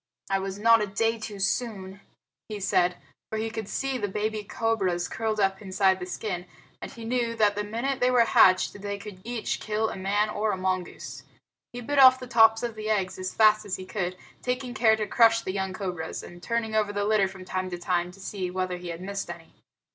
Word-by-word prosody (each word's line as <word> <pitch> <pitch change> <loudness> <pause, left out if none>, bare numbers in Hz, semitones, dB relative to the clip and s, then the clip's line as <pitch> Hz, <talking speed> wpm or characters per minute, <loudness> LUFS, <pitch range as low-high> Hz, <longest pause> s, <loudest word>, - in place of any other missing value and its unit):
"I 195 - +2
was 195 0 -4
not 230 +1 +5
a 210 - 0
day 225 +3 0
too 215 -2 -6
soon," 195 -1 -2 0.5
he 210 -1 -5
said, 180 -2 +2 0.3
for 220 - -3
he 220 +1 -2
could 220 -2 -5
see 270 +1 -2
the 205 - -1
baby 210 +2 -2
cobras 195 -5 -1
curled 220 -1 -2
up 195 0 +1
inside 190 -1 +2
the 180 - -6
skin, 180 -2 -4 0.3
and - - -7
he 230 -1 -9
knew 235 -1 -1
that 210 -2 +3
the 210 0 -2
minute 235 +6 -2
they 250 - +3
were 245 -2 +5
hatched 185 -1 +4
they 200 0 -3
could 200 -2 -10
each 235 -1 -3
kill 215 +1 -1
a - - -6
man 205 +3 0
or 210 0 0
a - - -3
mongoose. 180 -7 -3 0.5
He 245 - -7
bit 285 +4 0
off 260 -1 +8
the 255 - -7
tops 225 -2 +5
of 235 -1 -2
the 215 0 -5
eggs 190 -3 0
as 185 0 -4
fast 215 -1 +5
as 200 -3 -3
he 185 - -8
could, 185 -2 -3 0.2
taking 250 0 -2
care 220 -3 +4
to 215 -1 -2
crush 230 +1 +4
the 185 - -4
young 190 -1 -2
cobras, 180 -4 -5
and 175 0 -11
turned 230 0 -2
over 210 -1 +2
the 205 0 -1
litter 210 -2 +3
from 190 -1 -10
time 185 0 -3
to 175 - -4
time 175 0 -1
to 190 - -17
see 190 -1 -4
whether 185 0 -2
he 175 0 -9
had 170 0 -6
missed 195 -1 -4
any. 170 -1 -9
205 Hz, 225 wpm, -27 LUFS, 185-225 Hz, 0.5 s, off